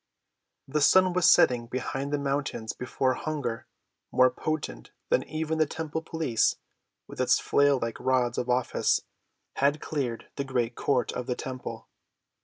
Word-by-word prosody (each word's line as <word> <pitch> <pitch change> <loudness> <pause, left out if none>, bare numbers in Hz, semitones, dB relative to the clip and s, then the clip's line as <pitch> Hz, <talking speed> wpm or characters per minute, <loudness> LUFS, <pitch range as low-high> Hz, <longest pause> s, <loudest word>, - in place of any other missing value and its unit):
The 150 +3 -1
sun 185 +4 +5
was 180 -1 +5
setting 120 -2 +4
behind 135 +3 -3
the 145 - +1
mountains 140 -5 -2
before 130 +1 -1
hunger, 135 -6 -4 0.4
more 130 0 +5
potent 155 - -4 0.2
than - - +3
even 160 0 -2
the 155 - +3
temple 160 +1 -4
police 160 -8 +1 0.5
with - - -6
its - - +4
flail‐like 135 -5 +2
rods 125 -2 +1
of 125 - -3
office, 125 0 +1 0.5
had 140 +2 +2
cleared 130 -8 -4
the 140 - -1
great 125 -3 -1
court 125 0 0
of 125 - -5
the 125 - -1
temple. 130 0 -6
135 Hz, 145 wpm, -27 LUFS, 125-150 Hz, 0.5 s, sun